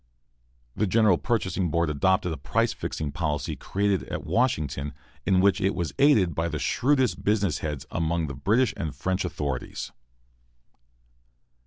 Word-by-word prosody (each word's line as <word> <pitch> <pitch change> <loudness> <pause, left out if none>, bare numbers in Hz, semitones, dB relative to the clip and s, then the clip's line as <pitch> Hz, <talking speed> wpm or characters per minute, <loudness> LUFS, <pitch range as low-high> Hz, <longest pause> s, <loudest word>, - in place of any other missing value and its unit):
The 105 - +1
General 105 -3 +4
Purchasing 95 -6 0
Board 85 0 +1
adopted 95 +5 +2
the 80 - -3
price 70 - 0
fixing 75 -2 -4
policy 75 -2 -2
created 100 -1 0
at - - -5
Washington, 75 - 0 0.3
in 95 -1 +4
which 100 +1 +3
it 95 -1 +1
was 85 -3 -2
aided 110 - +5
by 80 +3 -1
the 75 -2 -3
shrewdest 130 - +1
business 100 -6 +1
heads 75 -3 -4
among 80 0 0
the 70 - -5
British 110 - +2
and 75 -3 -4
French 95 +6 -1
authorities. 75 -8 -4
90 Hz, 145 wpm, -26 LUFS, 75-100 Hz, 0.3 s, aided